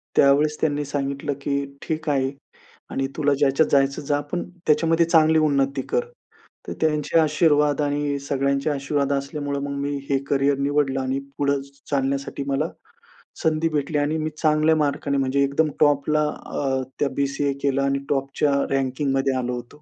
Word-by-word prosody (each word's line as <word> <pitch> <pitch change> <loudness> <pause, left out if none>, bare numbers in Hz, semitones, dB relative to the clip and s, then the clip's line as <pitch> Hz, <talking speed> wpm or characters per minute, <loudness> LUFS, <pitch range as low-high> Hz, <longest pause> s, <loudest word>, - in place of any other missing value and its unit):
त्यावेळेस 145 +2 +4
त्यांनी 145 -1 0
सांगितलं 140 0 -2
की 140 0 -1 0.2
"ठीक 155 -1 -3
आहे 135 -1 +1 0.6
आणि 135 0 -1
तुला 145 -2 +2
ज्याच्यात 140 +2 +3
जायचं 140 0 +2
जा. 145 0 0
पण 175 +5 -4 0.2
त्याच्यामध्ये 165 +2 +3
चांगली 160 -1 +4
उन्नती 140 -2 +1
कर." 485 0 +1 0.6
तर - - -4
त्यांचे 155 +1 +1
आशीर्वाद 150 -2 +3
आणि 145 0 -1
सगळ्यांचे 140 +1 0
आशीर्वाद 140 0 -1
असल्यामुळे 140 +1 -2
मग 140 0 -4
मी 145 0 -2
हे 135 - +3
करिअर 140 0 +2
निवडलं 140 -1 +1
आणि 130 +1 -1 0.2
पुढं 140 -1 +1 0.3
चालण्यासाठी 140 0 -1
मला 140 +4 0 0.7
संधी 160 +1 +2
भेटली 150 0 -1
आणि 145 +2 0
मी 155 0 -2
चांगल्या 155 0 +3
मार्काने 145 -1 0
म्हणजे 135 +1 +1
एकदम 140 +3 +1
टॉपला 150 +1 +3 0.3
अ, 135 -2 -1 0.2
त्या 145 - +2
बी-सी-ए 140 0 0
केलं 140 -1 +1
आणि 140 0 +1
टॉपच्या 140 +1 0 0.2
रँकिंगमध्ये 135 0 0
आलो 125 -1 -2
होतो. 120 0 -6
140 Hz, 150 wpm, -23 LUFS, 140-150 Hz, 0.7 s, त्यावेळेस